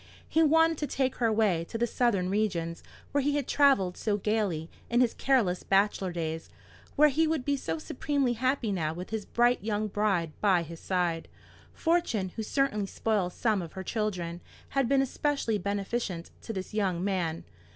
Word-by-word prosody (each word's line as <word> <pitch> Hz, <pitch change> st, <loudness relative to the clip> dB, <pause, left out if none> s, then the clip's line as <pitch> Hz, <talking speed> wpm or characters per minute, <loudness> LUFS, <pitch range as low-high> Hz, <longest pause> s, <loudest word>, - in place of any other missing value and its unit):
He 320 Hz, -, +2 dB
wanted 325 Hz, +1 st, +4 dB
to 295 Hz, -, -1 dB
take 265 Hz, -2 st, -1 dB
her 235 Hz, -, +2 dB
away 210 Hz, -6 st, +2 dB
to 225 Hz, -, -5 dB
the 235 Hz, -, +2 dB
southern 215 Hz, -6 st, +1 dB
regions, 180 Hz, -5 st, -1 dB, 0.3 s
where 285 Hz, -, +2 dB
he 285 Hz, +1 st, +1 dB
had 285 Hz, -3 st, -1 dB
travelled 270 Hz, -11 st, +3 dB
so 210 Hz, -2 st, 0 dB
gaily 200 Hz, -6 st, -1 dB, 0.2 s
in 240 Hz, -, +2 dB
his 245 Hz, -2 st, +3 dB
careless 230 Hz, -10 st, +2 dB
bachelor 195 Hz, -1 st, +2 dB
days, 160 Hz, -1 st, -4 dB, 0.5 s
where 300 Hz, +1 st, +6 dB
he 315 Hz, +3 st, +2 dB
would 310 Hz, -5 st, -1 dB
be 285 Hz, -, +2 dB
so 165 Hz, -12 st, -3 dB
supremely 270 Hz, -, -1 dB
happy 255 Hz, -1 st, 0 dB
now 160 Hz, -4 st, -1 dB
with 180 Hz, +4 st, -7 dB
his 220 Hz, -2 st, -3 dB
bright 240 Hz, -2 st, +2 dB
young 215 Hz, 0 st, -1 dB
bride 195 Hz, -6 st, 0 dB
by 190 Hz, -5 st, +4 dB
his 165 Hz, 0 st, -9 dB
side. 175 Hz, -3 st, -1 dB, 0.4 s
Fortune, 320 Hz, -, 0 dB
who 220 Hz, -, -6 dB
certainly 215 Hz, -3 st, 0 dB
spoils 195 Hz, -4 st, -1 dB
some 215 Hz, -5 st, +1 dB
of 165 Hz, -2 st, -8 dB
her 190 Hz, -, -6 dB
children, 180 Hz, -5 st, -2 dB, 0.3 s
had 270 Hz, -3 st, +1 dB
been 275 Hz, -1 st, +4 dB
especially 270 Hz, -5 st, -1 dB
beneficent 200 Hz, -3 st, -3 dB
to -, -, -6 dB
this 190 Hz, -1 st, -5 dB
young 190 Hz, -5 st, 0 dB
man. 180 Hz, -5 st, -1 dB
210 Hz, 180 wpm, -29 LUFS, 180-255 Hz, 0.5 s, where